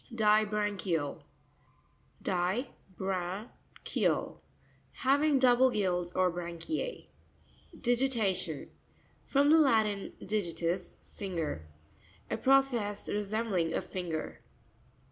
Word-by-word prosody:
Disra'ncurau 210 -7 +1 1.0
(di 185 +8 0 0.3
bra'nk 190 +3 -5
eal).— - - 0 0.5
Hav 275 +3 +2
ing 300 -3 +4
double 260 0 +5
gills 180 -6 0
or 185 -1 +2
branchie. 175 - -4 0.7
Dieira'tion.—From 240 - 0
the 320 - +7
Latin, 220 -8 +2
digi 190 -5 -2
ius, 170 +2 -2
finger. 165 - -4 0.6
A - - 0
process 250 -7 +2
resembling 205 -5 0
a - - 0
finger. 170 -4 -5
205 Hz, 85 wpm, -31 LUFS, 180-245 Hz, 1.0 s, the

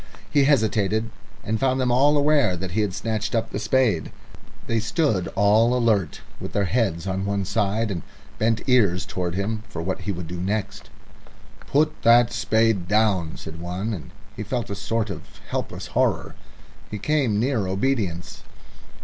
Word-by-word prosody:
He 140 -2 +4
hesitated, 110 -5 +2 0.3
and 110 +1 -1
found 130 0 +1
them 125 -1 +1
all 145 +4 +4
aware 145 -10 +3
that 90 0 -5
he 110 +5 +1
had 100 -3 -1
snatched 110 +1 -2
up 115 0 -1
the - - -3
spade. 110 - +1 0.5
They 115 - 0
stood 110 - 0
alert, 110 -2 +3 0.2
with - - -7
their 100 -1 +1
heads 95 -6 0
on 95 0 -2
one 100 -1 -1
side, 105 +2 0
and 85 -3 -3 0.4
bent 115 +3 0
ears 100 -8 +3
towards 90 -2 -3
him 105 +2 -2
for 85 - -6
what 95 +2 -3
he 100 - -2
would 90 -2 -5
do 85 +2 -6
next. 100 +1 -3 0.8
"Put 150 +2 +1
that 120 +1 +5
spade 110 -4 +1
down," 100 -6 +1
said 80 +1 -9
one, 90 +6 -3
and 80 -9 -7 0.3
he - - -6
felt 115 +1 -3
a - - -2
sort 110 +1 -2
of 85 - -6 0.3
helpless - - -4
horror. - - 0 0.6
He 105 - -4
came 125 -2 +1
near 115 -5 0
obedience. 95 -4 -2
105 Hz, 165 wpm, -24 LUFS, 95-115 Hz, 0.8 s, that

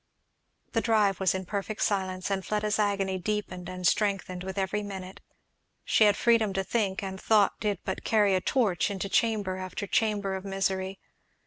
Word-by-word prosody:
The 225 - +1
drive 210 -5 +2
was 190 -1 +2
in 190 0 -4
perfect 205 +2 -3
silence, 190 -2 -1
and 190 -1 -1
Fleda's 210 +1 -1
agony 195 -2 0
deepened 185 -3 -3
and 180 0 -5
strengthened 195 -3 +1
with 190 +1 -6
every 195 +2 0
minute. 190 -2 -7 0.6
She 220 - +4
had 205 - +4
freedom 225 -4 +3
to 195 0 0
think, 200 0 -1
and 190 -1 -5
thought 210 -3 +3
did 205 -3 0
but 190 - -3
carry 210 -3 +3
a 185 - +2
torch 220 -6 +1
into 200 0 -3
chamber 205 -4 +1
after 185 +1 -5
chamber 205 -1 0
of 190 0 -4
misery. 195 -1 -2
195 Hz, 175 wpm, -28 LUFS, 190-210 Hz, 0.6 s, She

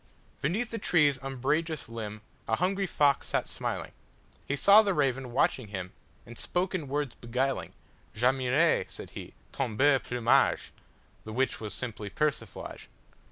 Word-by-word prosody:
Beneath 205 - 0
the 230 - -2
tree's 150 -8 +3
umbrageous 140 +4 -1
limbA 110 -2 -6 0.3
hungry 190 - +1
fox 145 -4 +2
sat - - 0
smiling; - - -4 0.6
He 140 - 0
saw 200 +8 +8
the 200 -4 +1
raven 135 -4 0
watching 125 -1 +1
him, 95 -3 -6 0.3
And 120 0 -11
spoke 180 +2 -1
in 165 -6 -2
words 145 -1 -2
beguiling:"J' 125 -2 -4
admire," 130 +5 +3
said - - -8
he, - - -9 0.2
"ton 125 -5 -2
beau 140 +1 +5
plumage,"(The 120 -2 -1
which 130 +1 0
was 105 -2 -4
simply 110 -4 -5
persiflage). 150 +5 -3
135 Hz, 135 wpm, -29 LUFS, 120-155 Hz, 0.6 s, saw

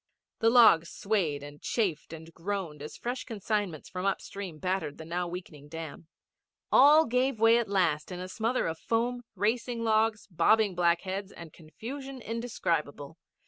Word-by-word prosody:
The 225 - +4
logs 220 -9 +6
swayed 175 -9 -1
and 145 0 -11
chafed 185 -12 -1
and 165 0 -10
groaned 170 -4 -4
as 150 - -8
fresh 245 +2 -4
consignments 205 - -3
from 180 0 -5
upstream 195 -3 -4
battered 180 -3 -2
the 160 - -9
now 175 +2 -2
weakening 170 -5 -8
dam. 160 0 -8 0.6
All 300 +4 +7
gave 250 0 0
way 225 +1 +6
at 235 - -3
last 180 -5 +1
in 180 - -5
a 185 - -5
smother 230 +6 -1
of 160 0 -3
foam, 240 +2 -1
racing 230 +2 -1
logs, 220 -1 +2
bobbing 215 +3 +3
black 175 -1 +2
heads 195 +1 -5
and 170 -3 -11
confusion 255 - -8
indescribable. 170 - -3
195 Hz, 155 wpm, -29 LUFS, 165-230 Hz, 0.6 s, All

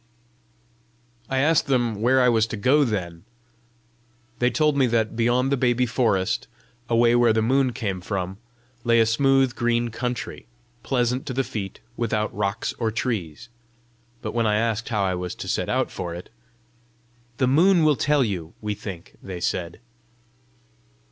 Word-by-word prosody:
I 135 - -1
asked 150 +3 +3
them 120 -6 0
where 130 +3 +4
I - - +4
was 115 -2 +3
to 110 - -5
go 135 +8 +4
then. 90 -9 -3 1.2
They 125 - +3
told 150 +1 +2
me 135 -2 +3
that, 115 -1 0
beyond 120 +3 +1
the 140 - +2
baby 125 0 +2
forest, 110 -6 0 0.4
away 120 0 +4
where 120 -2 +4
the 110 0 +1
moon 130 +2 +2
came 100 -5 -3
from, 95 +1 -4 0.4
lay 115 -1 +4
a 115 - +5
smooth 135 +2 +3
green 120 -1 0
country, 125 +1 -5 0.3
pleasant 125 +1 -1
to 130 - -3
the 135 - +1
feet, 100 -6 -6 0.2
without 110 -2 -1
rocks 100 +1 -2
or 115 -2 +1
trees. 110 - -3 0.7
But - - -4
when 115 -1 +1
I 105 - +2
asked 115 0 -1
how 105 -4 0
I 95 -1 0
was 90 0 -4
to - - -7
set - - -1
out - - 0
for 85 -1 -5
it. 90 - -10 1.1
"The 130 - +2
moon 165 +7 +4
will 155 -1 +4
tell 145 +1 +2
you, 90 -8 -4
we 105 -1 -3
think," 95 -4 -9
they 95 -2 -7
said. 85 0 -3
115 Hz, 160 wpm, -24 LUFS, 105-130 Hz, 1.2 s, a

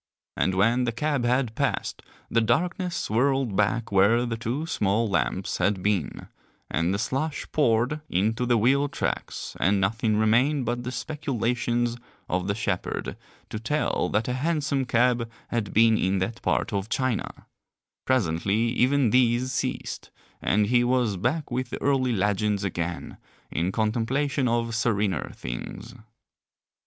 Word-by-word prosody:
And 95 - +1
when 115 +6 +3
the 120 - 0
cab 145 0 -1
had 125 -1 +1
passed - - -2 0.3
the 115 - +2
darkness 180 - 0
swirled 130 0 +1
back 105 +3 +1
where 100 +5 +4
the 115 -1 -2
two 120 +7 -3
small 110 - +1
lamps 90 - -1
had 95 0 +1
been, 100 -6 -1 0.4
and 85 +4 +1
the 100 - 0
slush 135 +8 -2
poured 125 +1 +2
into 110 +7 0
the 120 -1 +4
wheel 135 +6 +3
tracks - - -4
and 100 +1 +3
nothing 110 +2 +1
remained 125 +6 +3
but 120 +1 -2
the 125 - -4
speculations 120 -4 -1 0.3
of 90 +1 -1
the 100 - 0
shepherd 100 -4 -2 0.4
to 110 - -3
tell 150 +7 0
that 110 +2 0
a 125 - -1
hansom 145 -1 0
cab 120 -1 +2 0.2
had 115 -4 -2
been 115 0 +4
in 95 +1 +1
that 110 +6 -3
part - - 0
of 100 +1 -2
China; 130 -3 -2 0.6
presently 105 -1 +1
even 130 -2 +3
these 125 0 +3
ceased, 125 - -3 0.3
and 105 +2 +2
he 120 +3 +3
was 120 -4 +1
back 130 - -1
with 125 0 -2
the - - -5
early 130 -2 +1
legends 105 0 0
again 85 -2 -4 0.3
in 85 +4 0
contemplation 125 +6 0
of 115 0 0
serener 105 - 0
things. 95 - -7
115 Hz, 145 wpm, -26 LUFS, 105-130 Hz, 0.6 s, where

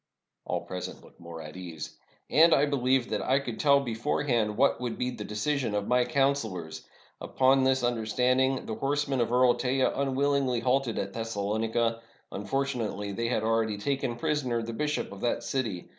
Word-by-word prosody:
All - - -2
present 90 -1 -7
looked - - -19
more 85 -1 -9
at 75 +1 -10
ease. 85 -4 -7 0.4
"And 165 +2 +6
I 140 - +3
believed 130 -3 +1
that 105 - 0
I 130 - +2
could 125 -5 -4
tell 140 -1 +5
beforehand 120 -3 -1
what 135 -1 +3
would 120 -2 -3
be 125 0 -1
the 110 - -6
decision 120 +2 -1
of 105 -1 -1
my 125 0 +3
counselors. 125 - -1 0.3
Upon 135 0 +3
this 130 0 +2
S55 - - -7
ROME 120 0 +2
understanding, 125 +4 +1
the 110 - -4
horsemen 140 +1 0
of 115 - 0
Earl 125 0 +5
Teja 130 +1 +1
unwillingly 135 -2 +1
halted 130 -1 +1
at 100 0 -3
Thessalonica; 115 +1 -1 0.3
unfortunately 110 -2 -2
they 115 +4 -2
had 115 -2 0
already 110 -1 +1
taken 130 +2 -1
prisoner 120 -2 -1
the 115 +1 -5
bishop 150 +1 -2
of 100 - -10
that 120 - 0
city. 115 -10 -3
120 Hz, 175 wpm, -28 LUFS, 110-135 Hz, 0.4 s, And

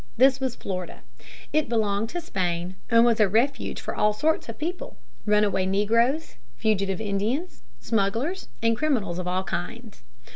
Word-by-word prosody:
This 265 +2 +5
was 260 -3 -2
Florida. 185 -2 -5 0.5
It 305 0 +2
belonged 215 -1 +1
to 350 +5 -4
Spain 180 - -2
and 230 -1 +6
was 235 -2 +3
a 210 - +6
refuge 235 +8 0
for - - -5
all 210 0 +3
sorts 300 +4 0
of 225 - -6
people: 345 +4 -4 0.3
runaway 210 -3 +3
negroes, 230 +10 +1 0.2
fugitive 200 -4 0
Indians, 220 - -2 0.2
smugglers, 230 - -1 0.2
and 230 0 +3
criminals 225 - 0
of 180 - -4
all 185 +1 0
kinds. 210 +6 -5
220 Hz, 150 wpm, -25 LUFS, 195-260 Hz, 0.5 s, and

